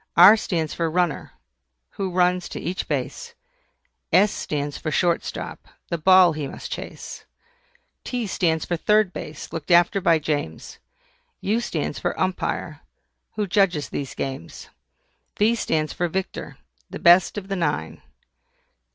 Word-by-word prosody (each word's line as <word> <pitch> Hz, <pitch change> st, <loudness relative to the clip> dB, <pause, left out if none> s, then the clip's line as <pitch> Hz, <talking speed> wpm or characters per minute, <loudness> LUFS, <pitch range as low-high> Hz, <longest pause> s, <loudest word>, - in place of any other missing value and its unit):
R 185 Hz, +5 st, +10 dB
stands 165 Hz, -7 st, -2 dB
for 165 Hz, -1 st, -1 dB
RUNNER, 175 Hz, -2 st, -1 dB, 0.6 s
who 195 Hz, -1 st, -3 dB
runs 180 Hz, 0 st, +1 dB
to -, -, -6 dB
each 180 Hz, +3 st, -4 dB
base. -, -, -4 dB, 0.8 s
S 205 Hz, +3 st, +5 dB
stands 145 Hz, -1 st, -3 dB
for -, -, -4 dB
SHORT 170 Hz, +2 st, +1 dB
STOP, -, -, -7 dB, 0.2 s
the 170 Hz, -, -2 dB
ball 185 Hz, 0 st, +6 dB
he 150 Hz, -2 st, -4 dB
must -, -, -8 dB
chase. -, -, -7 dB, 0.8 s
T 245 Hz, -2 st, -3 dB
stands 165 Hz, -5 st, 0 dB
for 175 Hz, -, -1 dB
THIRD 210 Hz, +1 st, +2 dB
BASE, 150 Hz, +1 st, -8 dB
looked 160 Hz, -3 st, -6 dB
after 175 Hz, +3 st, +4 dB
by 165 Hz, -2 st, +4 dB
James. 150 Hz, -1 st, -4 dB, 0.6 s
U 215 Hz, +4 st, 0 dB
stands 160 Hz, -11 st, -3 dB
for -, -, -2 dB
UMPIRE, 185 Hz, 0 st, -2 dB, 0.5 s
who 210 Hz, -1 st, 0 dB
judges 180 Hz, -6 st, +1 dB
these 140 Hz, -2 st, -5 dB
games. 130 Hz, -12 st, -6 dB, 0.7 s
V 215 Hz, +3 st, +4 dB
stands 155 Hz, -9 st, -1 dB
for 175 Hz, -, -1 dB
VICTOR, 190 Hz, +3 st, -4 dB, 0.3 s
the -, -, -6 dB
best 175 Hz, +4 st, +5 dB
of 195 Hz, -2 st, -5 dB
the 195 Hz, -, -2 dB
nine. 150 Hz, -5 st, -2 dB
175 Hz, 145 wpm, -23 LUFS, 155-190 Hz, 0.8 s, R